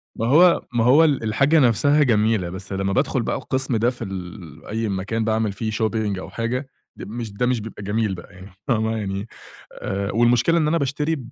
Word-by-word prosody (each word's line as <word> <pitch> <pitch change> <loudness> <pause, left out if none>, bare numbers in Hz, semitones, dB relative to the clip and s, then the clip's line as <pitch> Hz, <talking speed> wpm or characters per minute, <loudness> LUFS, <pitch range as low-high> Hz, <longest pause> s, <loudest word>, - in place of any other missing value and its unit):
ما 115 - -2
هو 170 +6 +5
ما 115 -1 +2
هو 140 +7 +6
ال 145 -7 +2
الحاجة 135 +9 +3
نفْسها 145 +4 +4
جميلة 110 -6 +2
بس 95 +2 -7
لمّا 95 0 -1
بادخُل - - +1
بقى - - -1
القسم 130 -2 -1
ده 120 +3 +2
في 120 -2 -7
ال 90 -4 -8
أي 110 0 -2
مكان 100 +4 -2
باعمل 110 -1 0
فيه 110 +2 -4
shopping 110 -3 -1
أو - - -8
حاجة، 125 +4 -3 0.3
د - - -9
مش 115 0 -6
ده 125 +5 -1
مش 125 -2 +1
بيبقى 105 -1 -8
جميل 105 -1 -1
بقى 90 +3 -12
يعني 95 +1 -13 0.2
فاهمة، 110 -2 0
يعني 100 0 -4 0.5
آآ 100 +1 -3
والمشكلة 120 +8 +3
إن 155 -2 +2
أنا 165 +2 +2
باشتري 150 +3 -1
110 Hz, 200 wpm, -22 LUFS, 100-125 Hz, 0.5 s, هو